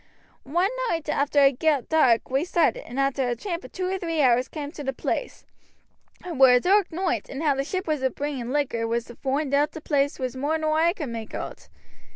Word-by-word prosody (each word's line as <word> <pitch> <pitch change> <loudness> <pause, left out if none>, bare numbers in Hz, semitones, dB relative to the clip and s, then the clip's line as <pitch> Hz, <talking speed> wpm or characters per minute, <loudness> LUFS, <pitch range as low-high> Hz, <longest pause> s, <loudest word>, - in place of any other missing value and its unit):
One 355 +7 +2 0.2
night 325 -2 -2
arter 285 0 +2
it 275 -2 +2
got 300 -5 +1
dark 260 -8 +3
we 270 +3 +2
started, 360 +8 +1
and 255 - -5
arter 275 -2 +1
a 240 - 0
tramp 345 - -5
of - - -11
two 370 -1 -3
or 380 +1 -2
three 330 -3 -2
hours 250 -2 +4
cam' 295 -2 -6
to 300 - -8
the 270 0 -2
place. 485 - -4 0.8
It 345 -5 -5
were 260 -1 +7
a 250 - +6
dark 385 +6 +3
noight, 360 +2 -2
and 275 +4 -5
how 295 -3 +3
the 275 0 -1
ship 370 +5 -4
as 305 -3 0
was 260 -1 +1
bringing 280 -4 -4
the - - -4
liquor 240 -6 0
was 235 0 -1
to 240 - -12
foind 275 +2 -2
oot 290 +2 +2
the - - -6
place 285 -1 0
was 255 -1 -3
more 290 +5 0
nor 310 -1 0
oi 340 +1 +3
could 300 -9 -5
make 225 -2 -6
oot. - - -7
290 Hz, 235 wpm, -25 LUFS, 260-325 Hz, 0.8 s, were